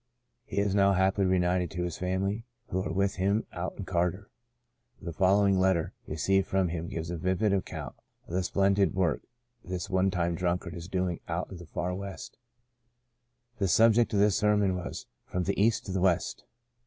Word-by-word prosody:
He - - -8
is 100 -1 +2
now 100 -1 +4
happily 95 +1 +2
reunited 90 -1 +2
to 90 - 0
his 85 -3 -3
family, 95 +4 -1 0.3
who 95 - -1
are - - -3
with 100 +2 0
him 100 +4 +1
out 90 +1 -4
in 100 - -5
Carter. 90 +2 -1 0.7
The 85 - -6
following 95 +2 +3
letter 95 -3 +2
received 95 +5 +1
from 95 -2 +1
him 85 0 -4
gives 80 0 -4
a 85 - -3
vivid 95 +5 +1
account 95 - -3 0.3
of - - -9
the 95 - +1
splendid 100 +1 +2
work 90 -5 +1 0.4
this 90 +1 -5
one 95 +1 +3
time 85 -2 0
drunkard 85 0 -1
is 85 +1 -7
doing 90 -2 -1
out 85 +3 -3
in 95 - -7
the 85 -1 -11
far 90 +2 -3
West: 100 +4 -7 1.2
The 100 - +2
subject 115 +4 +4
of 100 - +2
the 105 +1 +5
sermon 105 -1 +2
was 90 -1 -5
* - - -50
From 90 - -1
the 100 +2 0
East 110 0 +2
to 95 - -5
the 95 -1 -1
West.' 90 -2 +1
95 Hz, 190 wpm, -29 LUFS, 90-100 Hz, 1.2 s, the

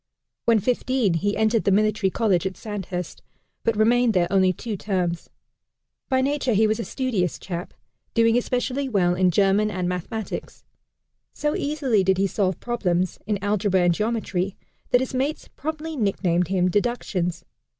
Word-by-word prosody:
When 230 -1 +5
fifteen, 250 -2 +1
he 205 +5 0
entered 220 0 +2
the 200 - +2
Military 215 0 +2
College 190 -4 +1
at 190 - -7
Sandhurst, 190 -5 -5 0.4
but 230 -2 +1
remained 235 +1 +3
there 175 -1 +4
only 190 -1 +4
two 215 +4 -5
terms. 180 -4 -2 0.8
By 260 -1 +3
nature 270 -2 0
he 215 +2 +4
was 215 +1 +1
a - - -1
studious 220 - -1
chap, 175 -1 -6 0.4
doing 230 0 +4
especially 255 +2 -1
well 180 -6 +2
in 180 0 +3
German 200 +3 +3
and 185 -3 -2
mathematics. 180 +5 -5 0.7
So 295 0 -1
easily 275 -9 +1
did 190 0 +2
he 195 - +2
solve 190 -2 0
problems 185 -7 -1
in 210 -2 +1
algebra 205 -2 +2
and 175 -1 +4
geometry, 200 -2 -2 0.3
that 245 - +4
his 260 - -3
mates 275 +4 -2
promptly 315 +2 -5
nicknamed 185 - +1
him 185 -1 +1
"Deductions." 180 -5 -1
210 Hz, 155 wpm, -24 LUFS, 185-240 Hz, 0.8 s, When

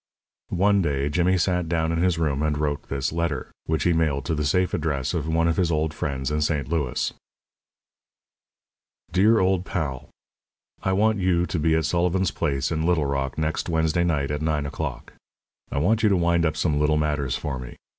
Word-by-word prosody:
One 100 +2 +3
day 70 -3 0
Jimmy 90 +5 +2
sat 90 -1 0
down 80 -1 0
in 85 0 0
his 90 -2 +2
room 75 -4 0
and 75 -1 0
wrote 75 -1 -2
this 70 +1 -2
letter, 85 -5 -2 0.2
which 80 -2 0
he 90 - +3
mailed 75 -5 0
to 85 - -1
the 75 -1 -1
safe 90 +6 +1
address 70 -4 -1
of 80 -3 -2
one 85 +1 +2
of 85 - 0
his 90 -3 +2
old 75 0 0
friends 70 -1 -3
in 75 0 0
St. 75 -4 0
Louis: 75 -5 -1 2.0
DEAR 105 +5 +4
OLD 95 -1 +2
PAL: 75 -10 -4 0.7
I 95 - 0
want 105 +2 +2
you 90 -2 +2
to 90 -2 -2
be 80 +1 +2
at 80 -2 +1
Sullivan's 90 +3 +1
place, 70 -5 -1
in 80 -1 -1
Little 85 -3 +2
Rock, 70 -2 -2
next 80 +2 -1
Wednesday 80 +1 +1
night, 75 -5 0
at 75 0 -2
nine 75 -2 0
o'clock. 70 -3 -5 0.6
I - - -3
want 105 +10 +2
you 110 - +4
to 100 - +3
wind 85 -1 +2
up 80 - -3
some 75 -4 +1
little 75 +1 +2
matters 75 -4 0
for 70 -4 -4
me. 60 -1 -9
80 Hz, 195 wpm, -24 LUFS, 75-85 Hz, 2.0 s, DEAR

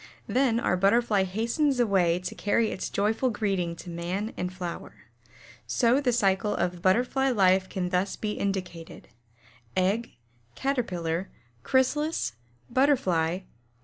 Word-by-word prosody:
Then 240 +1 +2
our 180 - +1
Butterfly 200 +1 +3
hastens 235 +8 0
away 190 -7 +3
to 180 0 -5
carry 220 +2 +1
its - - -4
joyful 220 +5 +1
greeting 195 -6 -1
to 175 - -10
man 180 +6 -3
and 180 0 -3
flower. 180 -2 -6 0.7
So 245 +3 +3
the 255 -3 +2
cycle 205 -3 +1
of 175 0 -2
Butterfly 250 +8 +2
life 190 -5 +3
can 180 -2 -2
thus 185 +2 0
be 215 - -3
indicated: 185 -5 -4 0.7
Egg, 200 +5 +1 0.4
Caterpillar, 185 -10 -2 0.3
Chrysalis, 265 - +1 0.3
Butterfly, 215 - +2
Egg. 185 +2 -6
200 Hz, 125 wpm, -27 LUFS, 180-240 Hz, 0.7 s, Butterfly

